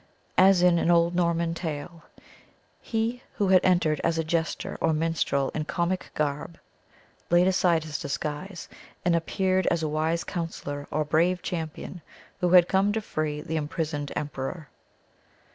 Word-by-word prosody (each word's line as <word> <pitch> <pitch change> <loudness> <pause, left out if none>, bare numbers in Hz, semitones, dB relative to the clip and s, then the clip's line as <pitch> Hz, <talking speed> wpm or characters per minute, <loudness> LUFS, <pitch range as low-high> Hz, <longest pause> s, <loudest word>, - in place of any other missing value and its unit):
As 185 -1 +6
in 175 -1 +5
an 165 - +1
old 170 0 +4
Norman 170 -1 +1
tale, 165 0 -5 0.8
he 230 +2 -2
who 200 -2 +1
had 185 -1 +6
entered 175 -4 +2
as 165 -1 +1
a 165 - +1
jester 160 +1 -2
or 160 - +2
minstrel 155 -4 0
in 155 -1 -3
comic 175 +3 -2
garb, 150 +2 -2 0.7
laid 175 +1 +5
aside 180 -4 +3
his 155 -2 -5
disguise, 150 +6 -4 0.4
and 175 -1 +3
appeared 185 +2 0
as 170 -1 +1
a - - +1
wise 160 +2 0
counsellor 145 -5 -5
or 155 0 -1
brave 170 +4 +2
champion 165 +1 -5 0.4
who 180 -1 +1
had 180 -1 +7
come 195 +2 +2
to 220 - -1
free 155 -6 -3
the 160 0 -3
imprisoned 150 -2 -3
emperor. 145 +1 -4
165 Hz, 150 wpm, -26 LUFS, 155-180 Hz, 0.8 s, had